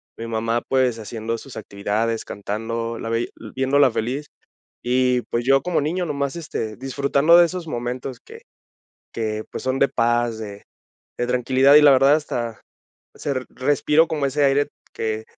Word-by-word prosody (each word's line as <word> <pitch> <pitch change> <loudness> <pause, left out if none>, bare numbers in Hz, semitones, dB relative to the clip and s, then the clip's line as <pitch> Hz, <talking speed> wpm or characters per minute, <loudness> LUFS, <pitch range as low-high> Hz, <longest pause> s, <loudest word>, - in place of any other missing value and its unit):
Mi 115 - -6
mamá, 115 +1 -1
pues, 130 -3 +2
haciendo 115 +1 -4
sus 135 - -11
actividades, 110 +2 -2
cantando, 115 +3 -4
la 115 - -5
veía 115 +1 0 0.3
viéndola 135 +1 +4
feliz. 130 +7 -3 0.5
Y, 125 0 +2
pues, 120 0 -1
yo 135 +1 +4
como 180 -4 0
niño 175 +5 -1
nomás, 140 -1 -2
este, 115 -9 -4
disfrutando 140 +5 +3
de 175 - +7
esos 170 -1 -5
momentos, 125 0 -4
que - - -14 0.7
que 110 -1 -3
pues, - - -6
son 130 +1 0
de 140 - +4
paz, 120 -1 +1
de 105 -2 -8 0.5
de 120 - 0
tranquilidad. 130 +3 +4
Y 150 - +9
la 145 -1 +8
verdad 135 +2 +6
hasta, 120 -7 -4 0.5
se 145 - -3 0.2
respiro 150 +4 +2
como 150 -3 -1
ese 145 +2 0
aire 140 +1 +2 0.3
que 110 0 -3
125 Hz, 160 wpm, -22 LUFS, 115-140 Hz, 0.7 s, Y